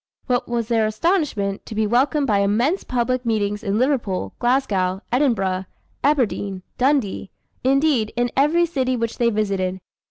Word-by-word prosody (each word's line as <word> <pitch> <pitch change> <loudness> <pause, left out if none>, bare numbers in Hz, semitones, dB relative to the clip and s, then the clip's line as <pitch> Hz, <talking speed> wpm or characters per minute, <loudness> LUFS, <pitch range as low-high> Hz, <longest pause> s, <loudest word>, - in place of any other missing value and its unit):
What 245 -2 0
was 235 -2 -1
their 225 -2 +2
astonishment, 220 - 0
to 220 - -7
be 220 0 +1
welcomed 270 +6 +2
by 210 -6 +2
immense 235 - +1
public 250 0 -1
meetings 210 -2 -1
in 200 -1 0
Liverpool, 230 - 0
Glasgow, 200 -7 +1
Edinburgh, 195 -8 +1 0.4
Aberdeen, 215 -9 0 0.2
Dundee; 255 -7 +1 0.3
indeed, 270 -4 +2
in 240 0 0
every 310 +6 +3
city 260 -6 -1
which 230 -1 -3
they 235 -1 +3
visited. 195 -4 -1
235 Hz, 140 wpm, -22 LUFS, 205-270 Hz, 0.4 s, every